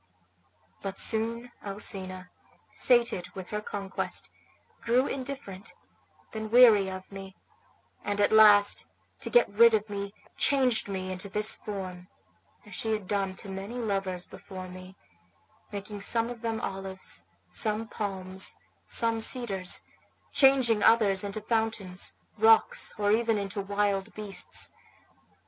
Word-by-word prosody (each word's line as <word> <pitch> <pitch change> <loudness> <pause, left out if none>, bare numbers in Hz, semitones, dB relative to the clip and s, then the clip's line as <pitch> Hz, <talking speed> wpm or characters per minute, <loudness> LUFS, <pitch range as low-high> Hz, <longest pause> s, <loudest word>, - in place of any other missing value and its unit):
But 195 0 -5
soon 230 +2 +1
Alcina, 190 -2 -4 0.4
sated 235 -7 +2
with 190 -2 -8
her 210 0 -2
conquest, 200 -2 -4 0.5
grew 245 +3 +2
indifferent, 260 -9 -6 0.6
then 220 -1 -5
weary 220 -5 +6
of 190 +1 -8
me, 195 -1 -9 0.7
and 205 0 -2
at 205 - +3
last, 210 -2 +6 0.3
to - - -6
get 485 - +5
rid 230 +1 +7
of 210 0 -3
me, 200 0 -5 0.2
changed 255 -6 +3
me 185 -1 -4
into 185 +2 -5
this 210 +2 +1
form, 185 -3 -7 0.6
as - - -13
she 220 -1 -2
had 210 -3 -4
done 195 -1 -1
to 200 - -8
many 195 +4 -6
lovers 195 -6 -2
before 185 -2 -9
me, 185 +1 -11 0.8
making 205 0 -7
some 230 +3 +1
of 235 -2 -9
them 225 -1 -2
olives, 190 - -5 0.3
some 220 +1 -1
palms, 190 -3 -2 0.3
some 230 -1 +2
cedars, 205 -7 +1 0.5
changing 260 -6 +4
others 205 -4 +4
into 205 +1 -4
fountains, 220 -4 -2 0.2
rocks, 450 +2 +4
or 205 -1 +1
even 225 0 +2
into 200 0 -3
wild 200 0 -1
beasts. 210 -2 -1
205 Hz, 125 wpm, -28 LUFS, 195-225 Hz, 0.8 s, rid